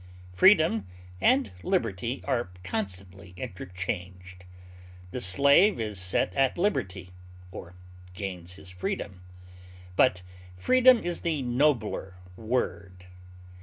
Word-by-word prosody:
Freedom 155 - +4 0.3
and 130 -3 +3
liberty 115 +6 -2
are 120 -8 -1
constantly 95 -1 -5
interchanged; 90 -3 -6 0.7
the 125 - -4
slave 140 - +5
is 105 -4 -3
set 90 0 0
at 135 - +1
liberty, 125 - -2 0.4
or 90 -1 -10 0.4
gains 90 -2 -6
his 90 -1 -12
freedom; 90 +1 -5 0.7
but 90 -5 +3 0.3
freedom 255 - +5
is 175 0 -3
the 155 -5 -1
nobler 120 -7 0 0.2
word. 95 -5 -3
100 Hz, 95 wpm, -27 LUFS, 90-130 Hz, 0.7 s, slave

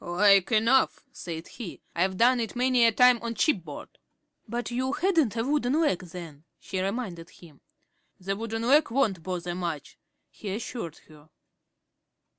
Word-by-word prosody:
"Like 195 +3 +4
enough," 230 +4 +3
said 165 -1 -7
he. 215 -9 -8 0.2
"I've 185 +2 0
done 245 +3 +4
it 230 0 -3
many 250 -1 +3
a - - +4
time 250 +2 +5
on 235 0 -4
shipboard." 180 - -2 0.5
"But 240 +2 -4
you 260 +3 -1
hadn't 320 - +1
a 225 - +1
wooden 280 +1 +1
leg 300 - +2
then," 165 -4 -10 0.2
she 185 - -4
reminded 190 -5 -4
him. 155 -5 -17 0.6
"The 195 +1 -3
wooden 225 +1 -4
leg 290 +6 +4
won't 230 -8 +1
bother 175 0 -4
much," 170 -5 -5 0.3
he 200 -2 -5
assured 220 -7 -6
her. 155 -1 -18
215 Hz, 150 wpm, -27 LUFS, 175-245 Hz, 0.6 s, time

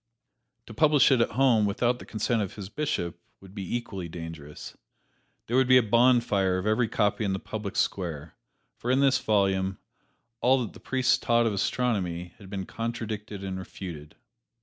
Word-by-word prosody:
To - - -10
publish 150 -3 +4
it 130 -3 +4
at - - 0
home 120 -6 +4
without 120 +4 0
the - - -11
consent 110 +1 0
of 100 - -4
his 100 -2 -7
Bishop 90 - -3 0.2
would 95 -1 -15
be 100 +1 -4
equally 95 -7 -6
dangerous. 80 -3 -8 0.7
There 120 - -2
would 130 -1 +4
be 130 0 +7
a 125 - +5
bonfire 110 -5 +3
of 95 - -4
every 110 +2 +2
copy 105 0 0
in 100 -2 0
the 95 - -2
public 105 -1 -6
square; 80 -5 -2 0.4
for 120 - -5
in 130 +1 +3
this 135 -1 +4
volume, 95 -2 +1 0.6
all 130 0 +4
that 110 - -7
the - - -13
priests 130 -1 +1
taught 120 0 +2
of 110 - +1
astronomy 95 -6 -1
had 100 -3 -12
been 95 -2 -4
contradicted 110 -3 -5
and 95 -1 -4
refuted. 85 -5 -8
105 Hz, 175 wpm, -27 LUFS, 95-120 Hz, 0.7 s, be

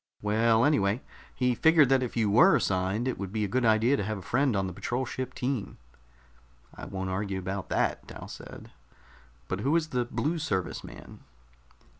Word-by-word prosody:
"Well, 110 +2 +3
anyway, 110 -5 +2 0.3
he 125 -1 +1
figured 155 +1 +5
that 135 -1 +4
if 125 -2 -4
you 110 -2 +2
were 165 - +6
assigned, 95 +5 0
it 130 - -2
would 100 -2 -5
be 110 0 -1
a - - -2
good 125 +6 0
idea 115 +4 +3
to - - -1
have 110 +1 -3
a - - -8
friend 130 +3 +1
on 95 -1 0
the 90 - -5
patrol 125 +8 -2
ship 130 +1 -5
team." 125 -4 -3 1.0
"I - - -9
won't 95 -1 -4
argue 95 0 -2
about 95 +1 -4
that," - - 0
Dal - - -9
said. - - -11 0.8
"But 95 - -3
who 140 +9 +1
is 160 -2 +1
the 125 -3 -1
Blue 160 +7 -2
Service 95 - -2
man?" - - -11
115 Hz, 190 wpm, -28 LUFS, 100-130 Hz, 1.0 s, were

